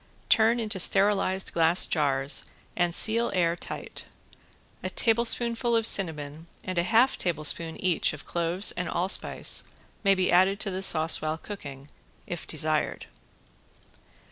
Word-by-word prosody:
Turn 225 +2 +3
into 215 -4 -3
sterilised 195 0 +2
glass 165 +2 +2
jars 140 -2 -1 0.3
and 175 -1 -1
seal 230 +2 +5
air 170 -2 +1
tight. - - -7 0.8
A - - -4
tablespoonful 235 +1 0
of 225 -1 0
cinnamon 160 -5 +2 0.2
and 185 -2 -3
a - - +1
half 230 +7 +2
tablespoonful 165 0 -1
each 180 -3 +1
of - - -11
cloves 170 +3 -1
and 180 0 -5
allspice 185 +3 0 0.4
may 195 -1 +3
be 185 -1 0
added 190 +3 +3
to 200 - -2
the 185 +1 -5
sauce 160 -3 +2
while 155 +1 -3
cooking 140 -7 -10 0.4
if - - -7
desired. - - -2
185 Hz, 135 wpm, -26 LUFS, 165-210 Hz, 0.8 s, seal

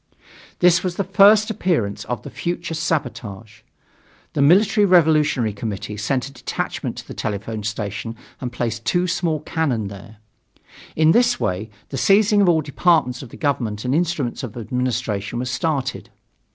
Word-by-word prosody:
This 180 0 +4
was 180 -2 -2
the 200 - 0
first 200 +3 +5
appearance 155 - -1
of 120 -3 -4
the - - -8
future 170 -1 -3
sabotage. 115 - -4 0.7
The - - 0
Military 200 +8 +5
Revolutionary 155 - +3
Committee 105 0 -5
sent 120 +5 -1
a - - -11
detachment 135 - -4
to - - -9
the - - -7
telephone 110 +1 -4
station 105 +1 -4 0.2
and 125 -3 -4
placed 115 -2 -3
two 175 +9 +1
small 165 -4 -1
cannons 135 - -1
there. 105 +2 -11 0.8
In 155 0 +5
this 240 +3 +3
way 95 +5 -2 0.2
the 135 - -4
seizing 205 - +4
of 190 - +4
all 160 -2 +3
departments 145 -4 +1
of 130 - -10
the - - -12
government 120 -8 -1
and 125 - 0
instruments 155 -6 -1
of 120 -3 -7
administration 120 -3 -2
was 125 +1 -2
started. 140 0 -2
135 Hz, 155 wpm, -21 LUFS, 110-175 Hz, 0.8 s, first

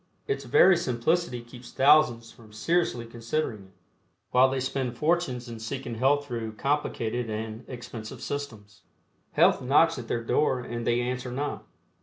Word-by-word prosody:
Its 135 0 -2
very 175 +9 +6
simplicity 160 -1 0
keeps 120 +1 -13
thousands 135 -5 +4
from 110 -2 -17
seriously 120 +1 0
considering 115 -2 -3
it, 95 - -21 0.6
while 130 +1 +5
they 135 0 -1
spend 130 -2 -2
fortunes 150 -6 0
in 115 -1 -7
seeking 120 +2 -5
health 135 +5 +2
through 115 -4 -4
complicated 125 -3 -1
and 110 +2 -5
expensive 120 -3 -8
"systems." 110 -8 -6 0.5
Health - - +4
knocks 145 +4 +3
at 120 - -8
their 115 - -2
door 130 +1 +1
and 120 -1 -5
they 120 +1 +2
answer 125 +1 -3
not. 145 +3 -4
125 Hz, 150 wpm, -27 LUFS, 115-140 Hz, 0.6 s, very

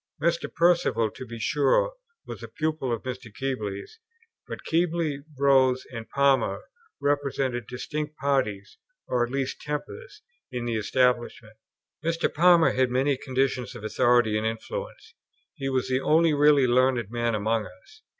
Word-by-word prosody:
Mr. 170 +2 0
Perceval, 165 -10 +2
to 130 - -9
be 115 +1 -7
sure, 150 - +2 0.3
was - - -8
a - - -7
pupil 155 -4 -2
of 115 - -2
Mr. 125 -3 -6
Keble's; 110 - -5 0.5
but - - -7
Keble, 165 -3 0 0.2
Rose, 130 -2 +3
and 115 -1 -7
Palmer, 140 - +2 0.4
represented 135 -5 -1
distinct 150 +4 -5
parties, 115 -9 -1 0.3
or 125 -1 +1
at 120 - -3
least 135 -1 -3
tempers, 425 - -6 0.3
in 120 -1 -4
the 120 -1 -1
Establishment. 120 -1 0 0.5
Mr. 165 0 0
Palmer 170 +1 +5
had 130 -1 +1
many 135 +3 +1
conditions 130 -3 -2
of 115 - -9
authority 110 +1 +3
and 110 - -1
influence. 485 - -6 0.4
He 135 -4 -4
was 130 -1 0
the 130 0 0
only 160 +2 +3
really 145 -2 +5
learned 125 -3 +2
man 120 -1 0
among 110 +1 0
us. 200 - -18
130 Hz, 145 wpm, -26 LUFS, 120-150 Hz, 0.5 s, Palmer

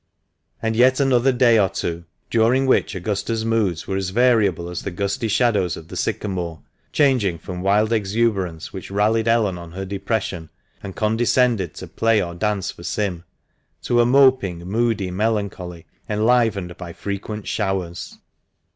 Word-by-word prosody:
And 110 0 0
yet 130 +3 +4
another 135 -1 +3
day 120 -3 +4
or 95 -2 +3
two, 85 -2 -4 0.3
during 120 +4 +3
which 120 -5 +2
Augusta's 105 +4 -2
moods 105 -8 0
were 95 - -2
as 95 -1 -2
variable 105 -6 +2
as 90 0 -5
the - - -4
gusty 100 +6 -2
shadows 105 -6 +1
of 80 - -12
the - - -8
sycamore, 90 -5 -3 0.3
changing 125 - +2
from 90 +2 -7
wild 105 +4 +2
exuberance 100 -6 -1
which 95 - -7
rallied 110 +3 +1
Ellen 110 -6 +2
on 85 -1 -10
her 95 +2 -5
depression, 100 -4 -3 0.3
and 95 - -8
condescended 110 -3 +1
to - - -8
play 115 -1 +2
or 85 -3 -3
dance 100 +1 -1
for - - -14
Sim, 90 -3 -2 0.6
to 120 0 +3
a - - +3
moping, 125 -10 +3
moody 105 -1 0
melancholy, 95 -4 -2 0.2
enlivened 105 -5 +1
by 85 -2 -8
frequent 100 +2 -5
showers. 95 -5 -3
105 Hz, 150 wpm, -21 LUFS, 90-115 Hz, 0.6 s, yet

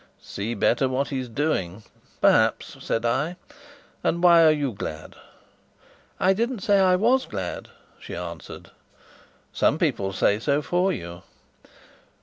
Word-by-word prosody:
"See 110 +4 -5
better 125 +5 +1
what 130 +2 -1
he's 130 -3 -4
doing? 110 - -2 0.4
Perhaps," - - +2
said 115 +1 -2
I. 140 +9 0 0.7
"And 170 +2 0
why 170 -2 +7
are 160 - +7
you 145 -4 -1
glad?" 80 -7 -7 1.0
"I 190 - +3
didn't 230 +2 -2
say 200 +1 +3
I 185 -1 +4
was 240 +7 +2
glad," 95 -4 -5 0.3
she - - -8
answered. 85 -3 -8 0.8
"Some - - +2
people 95 0 -1
say 100 +2 +1
so 140 +5 0
for 180 +4 +1
you." 85 - -7
135 Hz, 135 wpm, -24 LUFS, -, 1.0 s, why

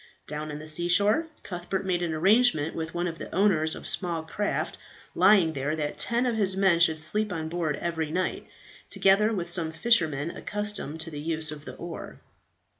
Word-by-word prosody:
Down 150 +1 -4
on 150 - -6
the 155 +1 -9
sea 170 +3 +1
shore, 205 - +3 0.2
Cuthbert 185 +1 -4
made 180 -2 0
an 170 -2 -1
arrangement 170 -1 +3
with 165 +1 -5
one 175 +1 -1
of 165 -1 -6
the - - -8
owners 170 -5 +3
of - - -10
small 170 -4 +1
craft 205 +6 -3 0.3
lying 185 -3 +5
there 145 +2 -2
that 150 -2 -4
ten 240 +1 +1
of 240 -2 0
his 195 -3 +1
men 190 -3 +4
should 160 -2 +4
sleep 210 +7 +1
on 160 -2 -4
board 165 -3 -1
every 165 -2 -3
night, 180 +4 -2 0.4
together 200 +3 +3
with 175 -5 -3
some 165 -2 -1
fishermen 160 -5 +2
accustomed 205 -7 -3
to 165 +1 -4
the 145 -1 -6
use 160 0 0
of 150 -1 -9
the - - -8
oar. 170 -1 -8
170 Hz, 190 wpm, -27 LUFS, 160-195 Hz, 0.4 s, lying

